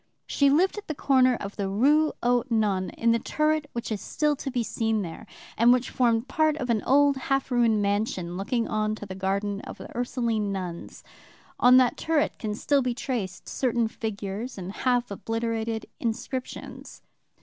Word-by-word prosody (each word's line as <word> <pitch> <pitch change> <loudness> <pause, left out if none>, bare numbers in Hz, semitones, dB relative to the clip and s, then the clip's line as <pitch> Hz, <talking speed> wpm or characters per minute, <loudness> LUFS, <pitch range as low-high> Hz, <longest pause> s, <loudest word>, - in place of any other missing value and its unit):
She 280 -1 +3
lived 365 +8 +3
at 420 - -14
the 310 - -3
corner 260 -3 +3
of 200 -2 -7
the 200 -2 -1
Rue 295 +10 +3
aux 245 -1 +3
Nonnes, 205 -5 +1
in 230 0 +3
the 230 - +2
turret 305 +3 0
which 235 -1 -4
is 210 - -2
still 300 -1 0
to 275 - -4
be 245 -2 -1
seen 220 -2 -1
there, 175 +5 -8 0.3
and 235 +2 +5
which 250 0 +2
formed 235 -1 +2
part 310 +2 +1
of 250 -5 -1
an 220 -3 +1
old 280 +1 +4
half 270 0 -1
ruined 230 -4 +3
mansion 200 -4 -1
looking 225 +5 -1
on 215 0 0
to 210 - -8
the 190 - -7
garden 200 +2 -2
of - - -9
the - - -11
Ursuline 235 -4 -1
nuns. 180 -3 -6 0.6
On 250 +1 +7
that 255 -1 +4
turret 320 -2 0
can 210 -2 -3
still 280 +5 +2
be 250 -2 -1
traced 230 -9 -4
certain 240 -3 0
figures 215 +2 -5
and 185 0 -5
half 245 +1 0
obliterated 225 +1 -2
inscriptions. 245 +3 -5
230 Hz, 180 wpm, -26 LUFS, 210-260 Hz, 0.6 s, On